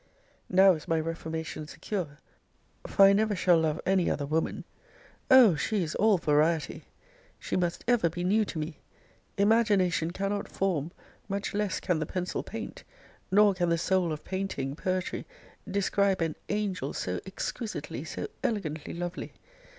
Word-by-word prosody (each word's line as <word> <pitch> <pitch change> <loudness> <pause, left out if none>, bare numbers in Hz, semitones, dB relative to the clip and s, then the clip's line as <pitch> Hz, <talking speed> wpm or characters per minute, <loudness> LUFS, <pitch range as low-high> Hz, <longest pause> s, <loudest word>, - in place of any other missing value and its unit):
Now 190 +1 +6
is 155 - -7
my 165 -1 +2
reformation 160 -1 -4
secure; 150 +1 -5 0.7
for 195 - +6
I 195 - +7
never 210 +1 +2
shall 180 -2 +4
love 155 -1 0
any 190 -2 +2
other 145 - -1
woman! 155 +3 -1 0.7
Oh! 255 -8 +8
she 190 +6 0
is 155 - -4
all 215 -1 +4
variety! 155 0 +1 0.5
She - - -4
must 175 -2 -1
ever 235 -8 +3
be 175 +2 -5
new 210 +4 +3
to 175 - -6
me! 155 0 -4 0.6
Imagination 200 -6 +3
cannot 195 +3 -2
form; 170 -5 -1 0.4
much 200 +1 -2
less 205 -2 -1
can 175 -3 0
the 155 - -2
pencil 185 -1 -3
paint; - - -7 0.5
nor 205 +1 +5
can 175 -2 0
the 170 - +2
soul 180 0 +1
of 150 -1 -5
painting, 185 -8 -3
poetry, 185 +2 -2 0.4
describe 200 0 +1
an 165 -2 0
angel 200 -8 -2
so 90 0 -3
exquisitely, 215 +3 -5
so - - -5 0.2
elegantly 160 -10 -2
lovely! 175 +1 -5
180 Hz, 150 wpm, -29 LUFS, 160-200 Hz, 0.7 s, Oh